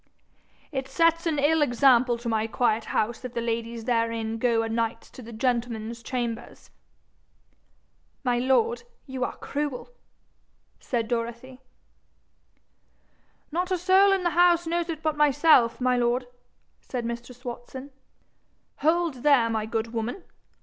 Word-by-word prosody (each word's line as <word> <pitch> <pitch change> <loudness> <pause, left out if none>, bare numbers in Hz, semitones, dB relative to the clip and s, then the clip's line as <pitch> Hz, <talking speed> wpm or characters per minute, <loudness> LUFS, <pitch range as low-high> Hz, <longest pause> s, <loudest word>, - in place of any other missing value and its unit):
'It 265 -2 -3
sets 330 +4 +2
an 315 -2 0
ill 300 +3 +3
example 245 -2 +4
to 235 +1 -7
my 220 -1 0
quiet 225 -1 0
house 235 +4 -1
if 250 -1 -7
the - - 0
ladies 230 0 -3
therein 230 -2 -1
go 235 -1 +2
anights 230 0 -2
to - - -11
the 235 0 -10
gentlemen's 235 -1 -2
chambers.' 235 -1 -5 1.5
'My 245 -2 +1
lord, 355 - +2 0.2
you 265 -2 -4
are - - -3
cruel,' 290 - -4 0.9
said 230 -3 -2
Dorothy. 235 +3 -4 1.9
'Not 355 +4 -1
a 370 - +1
soul 380 +3 +5
in 385 -2 +1
the 345 - +1
house 345 +1 +4
knows 340 +1 -1
it 320 -1 -5
but 310 -1 0
myself, 295 -4 +4
my 255 0 +2
lord,' 245 +1 +1 0.5
said 245 -3 -5
mistress 240 +1 -7
Watson. 255 +3 -7 0.9
'Hold 320 -3 +1
there, 255 -6 +4
my 220 -1 -1
good 225 0 -3
woman! 235 - -3
250 Hz, 135 wpm, -26 LUFS, 230-295 Hz, 1.9 s, soul